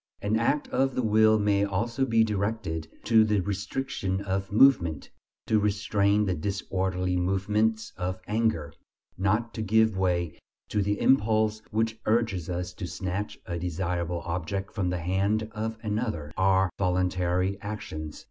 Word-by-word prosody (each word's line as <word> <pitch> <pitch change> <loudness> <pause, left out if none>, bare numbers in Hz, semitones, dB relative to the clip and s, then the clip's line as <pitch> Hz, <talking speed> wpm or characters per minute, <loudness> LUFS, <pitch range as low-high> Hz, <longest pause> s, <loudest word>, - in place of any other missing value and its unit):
An 105 +2 0
act 145 +6 +1
of 135 -1 +1
the 130 - 0
will 110 0 +5
may 105 -1 +2
also 115 +7 0
be 115 -3 +4
directed 100 -6 -2 0.2
to 110 -1 +5
the 105 -1 +2
restriction 100 0 -2
of 95 0 -2
movement: 100 - +4 0.3
to 110 - +3
restrain 105 0 +2
the 95 - 0
disorderly 95 0 -2
movements 105 +4 0
of 90 0 -3
anger; 105 -10 0 0.4
not 105 +5 0
to 110 - -4
give 110 0 +3
way 90 -3 0 0.3
to 105 - +1
the 105 +1 0
impulse 110 -3 +3
which 110 +1 -1
urges 110 -7 +1
us 90 0 -3
to 90 - -6
snatch 95 +3 -4
a 85 -1 -4
desirable 85 0 -2
object 90 +3 -3
from 95 -5 -1
the 90 -1 -2
hand 100 +5 0
of 110 +1 -4
another, 105 -8 -2
are 95 -1 +3
voluntary 90 +1 0
actions. 80 -7 -6
100 Hz, 145 wpm, -27 LUFS, 90-110 Hz, 0.4 s, will